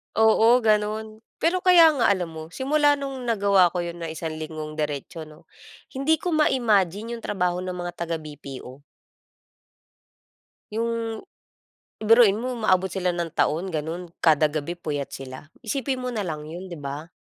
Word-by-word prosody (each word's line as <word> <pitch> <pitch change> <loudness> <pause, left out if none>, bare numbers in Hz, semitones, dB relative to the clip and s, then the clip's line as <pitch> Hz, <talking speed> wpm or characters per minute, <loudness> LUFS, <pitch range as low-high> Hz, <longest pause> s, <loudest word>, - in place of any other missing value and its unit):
Oo, 225 +2 +5
ganon. 215 0 0 0.2
Pero 345 +3 +3
kaya 350 -3 +7
nga 275 -6 +2
alam 180 -4 +1
mo 160 0 -8
simula 290 +2 +3
nung 275 -1 -5
nagawa 200 -4 +4
ko 175 - 0
yun 170 0 -6
ng 165 -1 -5
isang 160 0 -4
linggong 155 0 -6
diretso, 150 +2 -4
no? 155 +2 -16 0.5
Hindi 275 +4 +2
ko 350 +3 -3
ma-imagine 230 - +1
yung - - -19
trabaho 180 -2 -1
ng 185 0 -4
mga 175 0 -4
taga 170 -1 -4
BPO 140 -4 -9 1.9
Yung 230 0 -2 0.8
biruin 220 -2 +6
mo 250 +3 -3
umaabot 190 -5 +1
sila 180 -2 -1
ng 170 -2 -3
taon 175 +5 0
ganun 165 +2 -4
kada 155 -2 +4
gabi 155 +3 -3
puyat 150 -5 -4
sila, 130 +2 -9 0.2
isipin 260 +2 -2
mo 250 - -2
na 225 -3 -2
lang 150 -2 -4
yun, 170 +5 -8
di 175 - -7
ba? 145 +2 -6
185 Hz, 155 wpm, -24 LUFS, 160-230 Hz, 1.9 s, kaya